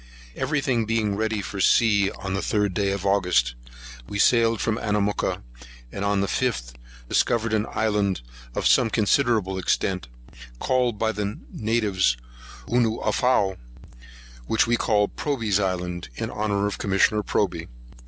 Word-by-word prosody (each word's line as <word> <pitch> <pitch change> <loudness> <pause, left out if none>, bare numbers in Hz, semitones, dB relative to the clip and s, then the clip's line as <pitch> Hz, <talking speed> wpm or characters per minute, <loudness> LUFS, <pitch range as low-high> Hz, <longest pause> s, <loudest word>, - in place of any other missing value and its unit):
Every 150 -2 -1
thing 120 -5 0
being 110 -2 0
ready 110 -1 -1
for 100 +1 -4
sea 100 -1 +4
on 95 -1 -6
the 95 - 0
3d 105 -1 0
day 100 +1 0
of 100 0 -3
August, 90 -11 +2 0.6
we 100 - -4
sailed 115 0 +3
from 110 +1 -1
Anamooka; 105 - -1 0.5
and 100 - -5
on 100 -1 +1
the - - +1
5th, 95 - -1 0.3
discovered 115 - +1
an 110 0 +1
island 105 - 0 0.3
of - - -2
some 115 - +4
considerable 110 -4 +1
extent, 95 -3 -1 0.5
called 125 - 0
by 110 +1 +1
the 105 0 -3
natives 105 - +1 0.5
Onooafow,[138 120 0 +2
1] 95 - -9 0.9
which 110 +1 +3
we 120 +1 +2
called 105 -3 +1
Proby's 115 -9 0
Island, 90 -3 -2
in - - -4
honour 100 -1 -1
of 105 - -3
Commissioner 100 +2 +2
Proby. 90 -5 -1
105 Hz, 145 wpm, -24 LUFS, 95-115 Hz, 0.9 s, sea